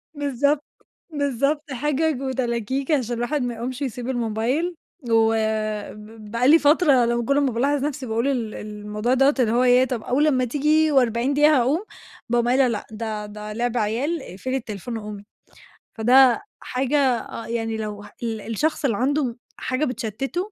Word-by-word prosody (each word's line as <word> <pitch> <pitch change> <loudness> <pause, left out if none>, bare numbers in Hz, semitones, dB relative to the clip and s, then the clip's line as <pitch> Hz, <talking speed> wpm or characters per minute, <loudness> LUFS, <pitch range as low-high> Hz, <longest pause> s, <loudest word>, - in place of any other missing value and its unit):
بالضبط، 285 +1 0 0.5
بالضبط، 285 +1 -1
حِجج 295 +2 0
وتلاكيك 260 +1 -2
عشان 245 -5 +1
الواحد 275 +5 -1
ما 245 -1 -2
يقومش 250 +4 -5
ويسيب 250 -1 -4
الموبايل، 245 +8 -1 0.4
وب 225 0 +4 1.0
بقى 235 +2 +1
لي 320 +4 +7
فترة 290 -4 +4
لمّا 235 0 0
كُلّ 280 +3 +2
ما 275 -3 +1
بالاحظ 275 +4 0
نَفْسي 285 -2 -3
باقول 230 +2 -1
ال 240 -6 -1
الموضوع 210 +2 -3
دوّة 270 +2 +4
اللي 230 -3 +3
هو 245 +2 +3
ياه، 250 +1 +5
طَب 245 -3 -4
أول 285 +5 +2
أمّا 255 -4 +2
تيجي 300 +4 +2
و40 250 -1 +2
دقيقة 295 +1 +5
هاقوم، 290 - +1 0.5
باقوم 240 0 +2
قايلة 255 +1 +4
لأ 220 -4 -3
ده 215 -1 -4
ده 210 0 -8
لِعْب 240 +2 -1
عيال، 245 +10 -1
اقفلي 255 +6 -5
التليفون 225 -1 -6
وقومي، 210 -2 -7 0.7
فده 250 +3 +5 0.2
حاجة 265 +3 -1 0.2
آه، 230 - -8
يعني 225 -1 -2
لو 210 -1 -5
ه 205 - -13
ال 225 -2 -3
الشخص 285 +9 -1
اللي 230 -7 +1
عنده 265 -1 0 0.2
حاجة 260 +4 -1
بتشتته 260 - -3
250 Hz, 160 wpm, -23 LUFS, 225-280 Hz, 1.0 s, لي